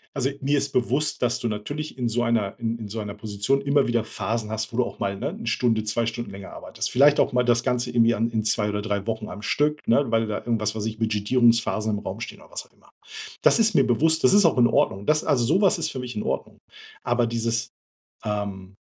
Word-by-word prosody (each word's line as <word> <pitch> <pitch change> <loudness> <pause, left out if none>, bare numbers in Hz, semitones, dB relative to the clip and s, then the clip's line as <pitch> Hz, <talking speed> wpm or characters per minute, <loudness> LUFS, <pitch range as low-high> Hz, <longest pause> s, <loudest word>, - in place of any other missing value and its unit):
Also, 135 -1 0
mir 145 +2 +1
ist 140 0 -2
bewusst, 130 +5 0
dass 120 -1 +1
du - - -4
natürlich 145 +9 -4
in 125 -2 -1
so 120 +1 0
einer 115 -4 0
in 115 0 -2
in 110 -2 -7
so 110 +3 -6
einer 105 -2 -5
Position 105 +5 -1
immer 140 0 +2
wieder 120 -1 +1
Phasen 110 0 -3
hast, 110 0 -3
wo - - -5
du 125 - +4
auch - - -8
mal, 100 0 -2
ne, - - -4
'ne - - -9
Stunde, 115 -1 +1
2 110 +2 0
Stunden 120 +1 -4
länger 95 0 -9
arbeitest. - - -5
Vielleicht 145 +3 +5
auch - - +2
mal 125 0 +2
das 120 -1 +2
Ganze 125 -1 -1
irgendwie 115 0 +3
an 115 +2 +1
in 110 -1 -1
2 105 0 +1
oder 105 0 -2
3 100 -1 -2
Wochen 110 -1 -3
am 105 - -8
Stück, 150 +5 0
ne, 115 +4 +4
weil 115 0 +2
da 105 -1 -2
irgendwas 110 -2 -1
weiß 110 -1 -4
ich 110 0 -4
Budgetierungsphasen 115 0 +2
im - - -5
Raum - - -5
stehen - - -7
oder - - -18
was - - -6
auch - - -32
immer. - - -25 0.5
Das - - +5
ist 220 -1 +3
mir - - +5
bewusst. 160 +7 +2
Das - - +6
ist 205 -1 +6
auch 165 - +3
in 120 - +6
Ordnung. 100 -3 +1
Das 155 0 +3
also, 135 -6 +2
sowas 185 - +3
ist - - -1
für 130 - -5
mich 125 -2 -7
in 105 - -3
Ordnung. - - -3 0.5
Aber 120 0 +1
dieses, 115 0 -1 0.5
ähm, 100 -2 -4
115 Hz, 250 wpm, -24 LUFS, 110-125 Hz, 0.5 s, Das